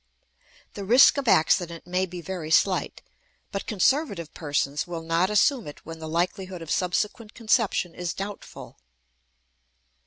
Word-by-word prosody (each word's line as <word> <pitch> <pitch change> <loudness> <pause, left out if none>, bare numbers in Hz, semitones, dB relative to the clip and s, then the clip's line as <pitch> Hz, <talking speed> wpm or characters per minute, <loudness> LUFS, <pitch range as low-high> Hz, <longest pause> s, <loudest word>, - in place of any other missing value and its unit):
The 200 - -6
risk 245 +7 +6
of 270 - -5
accident 170 -2 +2
may 180 +1 -1
be 175 0 -8
very 170 -2 -6
slight, 185 +3 +1 0.5
but 195 - -5
conservative 205 - 0
persons 145 -1 -2
will 170 -2 -5
not 165 +3 +1
assume 220 - +2
it 145 - -11
when 165 0 -8
the 160 0 -7
likelihood 180 +2 -2
of 160 - -7
subsequent 210 +4 -1
conception 220 -6 +1
is 175 -1 -4
doubtful. 200 +1 -8
180 Hz, 135 wpm, -25 LUFS, 165-205 Hz, 0.5 s, risk